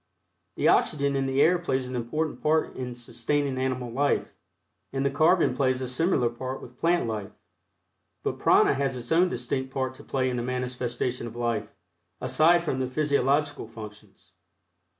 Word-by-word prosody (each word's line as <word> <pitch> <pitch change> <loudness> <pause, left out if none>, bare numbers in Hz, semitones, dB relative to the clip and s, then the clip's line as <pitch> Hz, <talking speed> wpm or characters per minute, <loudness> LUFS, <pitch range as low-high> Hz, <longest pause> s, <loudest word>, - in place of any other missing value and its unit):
The - - +1
oxygen 140 -2 +3
in 135 0 0
the 135 +2 +3
air 175 +3 +4
plays 130 -6 -1
an 130 - -5
important 145 +7 -2
part 155 +1 +1
in 125 -1 -5
sustaining 130 +3 -2
animal 130 -2 -2
life, 140 +4 0 0.6
and 135 0 -1
the 140 - +2
carbon 155 -1 +3
plays 130 -1 +1
a 130 - -3
similar 130 0 +1
part 130 +3 -5
with 125 +1 -13
plant 175 -2 +2
life, 105 -3 -3 0.9
but - - -2
Prana - - +5
has 135 -1 -1
its 120 -1 -8
own 175 +3 +4
distinct 130 +1 -3
part 130 -1 -2
to - - -14
play 130 -1 -1
in 125 - -2
the - - -1
manifestation 125 -1 -3
of 115 - -9
life, 115 -3 -1 0.5
aside 160 +7 +4
from 135 -5 -1
the 130 - 0
physiological 145 -1 +1
functions. 105 -4 -12
130 Hz, 170 wpm, -27 LUFS, 120-145 Hz, 0.9 s, Prana